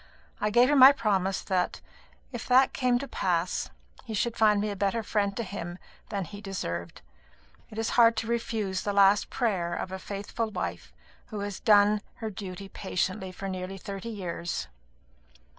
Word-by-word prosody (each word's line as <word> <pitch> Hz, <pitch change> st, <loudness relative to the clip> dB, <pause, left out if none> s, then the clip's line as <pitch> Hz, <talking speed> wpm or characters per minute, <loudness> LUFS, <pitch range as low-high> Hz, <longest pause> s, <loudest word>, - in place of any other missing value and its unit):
I 210 Hz, -, +1 dB
gave 240 Hz, +3 st, +5 dB
her 295 Hz, -, +3 dB
my 265 Hz, 0 st, +10 dB
promise 195 Hz, -8 st, 0 dB
that, 180 Hz, -2 st, 0 dB, 0.5 s
if 240 Hz, -2 st, -6 dB
that 260 Hz, +1 st, +5 dB
came 250 Hz, -2 st, +2 dB
to 275 Hz, +3 st, -5 dB
pass, 180 Hz, -6 st, -1 dB, 0.3 s
he 220 Hz, -, -5 dB
should 235 Hz, +2 st, 0 dB
find 210 Hz, -2 st, +4 dB
me 210 Hz, +1 st, -1 dB
a -, -, -4 dB
better 200 Hz, +4 st, 0 dB
friend 200 Hz, -2 st, 0 dB
to 235 Hz, -, -1 dB
him 175 Hz, -3 st, -6 dB, 0.3 s
than 200 Hz, -3 st, -2 dB
he 205 Hz, +3 st, -10 dB
deserved. 85 Hz, -, -5 dB, 0.7 s
It 215 Hz, -, -11 dB
is 225 Hz, 0 st, -1 dB
hard 230 Hz, -2 st, +5 dB
to 220 Hz, -, -1 dB
refuse 220 Hz, -5 st, -1 dB
the 205 Hz, -, -2 dB
last 200 Hz, +1 st, +5 dB
prayer 185 Hz, -8 st, -1 dB
of 185 Hz, -, -4 dB
a 190 Hz, -, -5 dB
faithful 205 Hz, +4 st, -4 dB
wife 85 Hz, -, -5 dB, 0.4 s
who 210 Hz, -2 st, -5 dB
has 200 Hz, -1 st, -4 dB
done 210 Hz, -1 st, +5 dB
her 220 Hz, -2 st, -5 dB
duty 195 Hz, -1 st, -7 dB
patiently 190 Hz, 0 st, -2 dB
for 195 Hz, +2 st, -6 dB
nearly 185 Hz, 0 st, -5 dB
thirty 195 Hz, +3 st, -6 dB
years." 175 Hz, -, -4 dB
205 Hz, 175 wpm, -28 LUFS, 185-225 Hz, 0.7 s, my